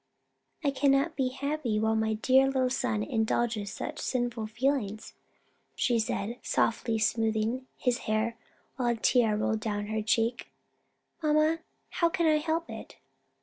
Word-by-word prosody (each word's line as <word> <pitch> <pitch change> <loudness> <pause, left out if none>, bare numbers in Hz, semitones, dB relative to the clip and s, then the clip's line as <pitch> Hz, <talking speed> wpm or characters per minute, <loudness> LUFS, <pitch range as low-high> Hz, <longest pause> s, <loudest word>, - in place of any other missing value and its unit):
"I 285 - +2
cannot 275 +3 +2
be 265 -2 +1
happy 270 -4 -2
while 220 +1 +2
my 220 0 +1
dear 260 +4 +4
little 260 -2 +1
son 110 - 0
indulges 220 - 0
such 300 +8 -5
sinful 240 -3 -2
feelings," 225 -2 -1 0.6
she 240 -2 +2
said, 225 +1 -2
softly 230 0 0
smoothing 225 +3 0
his 250 -2 0
hair, 220 +2 +1 0.4
while 250 -2 0
a 240 - +2
tear 230 -1 +3
rolled 220 +1 0
down 205 -1 -2
her 220 - 0
cheek. 225 +2 0 0.7
"Mamma, 310 +1 +3 0.3
how 335 - +2
can 340 -1 0
I 310 -1 +5
help 320 +2 -1
it?" - - -9
240 Hz, 145 wpm, -29 LUFS, 220-275 Hz, 0.7 s, I